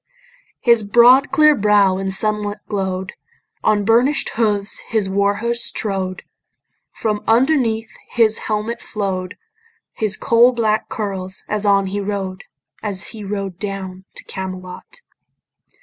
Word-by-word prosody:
His 235 -2 +5
broad 240 +6 +6
clear 305 -3 +5
brow 205 -5 +3
in 195 0 -2
sunlight 210 +1 0
glow'd; 190 -2 -3 0.5
On 210 -2 +2
burnish'd 245 +7 +3
hooves 210 -3 0
his 220 -3 +1
war 200 +1 +1
horse 235 +2 -1
trode; 190 -3 -3 0.7
From 215 -2 -2
underneath 230 -2 +2
his 225 -2 +3
helmet 220 +2 -2
flow'd 190 -3 -4 0.6
His 210 -3 -1
coal 235 +2 +4
black 220 -3 0
curls 190 -3 -4
as 210 0 -2
on 200 -1 +4
he 195 +2 -3
rode, 195 -1 -4 0.4
As 200 -3 -4
he 220 -2 -9
rode 195 -2 -4
down 190 -2 -6
to - - -5
Camelot. 185 - -8
205 Hz, 125 wpm, -19 LUFS, 195-225 Hz, 0.7 s, broad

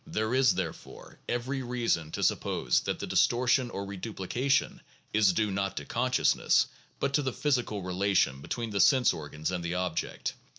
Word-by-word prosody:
There 110 -7 -1
is, 130 -1 +4
therefore, - - -6
every 130 +3 -2
reason 120 -10 -1
to - - -2
suppose - - +1
that - - -3
the - - -5
distortion 125 +1 +2
or 100 -3 -5
reduplication 110 +7 -1 0.3
is 105 -3 +5
due 105 +2 0
not 100 0 -2
to 75 - -4
consciousness, 125 - +2 0.3
but 140 - -1
to 150 - +3
the 130 -2 -1
physical 125 -8 -1
relation 90 -6 +1
between 115 - -4
the 100 -1 +1
sense 130 -4 +5
organs 75 +2 -5
and 90 -2 -3
the 85 +1 -2
object. 90 -3 -2
110 Hz, 165 wpm, -29 LUFS, 90-125 Hz, 0.3 s, is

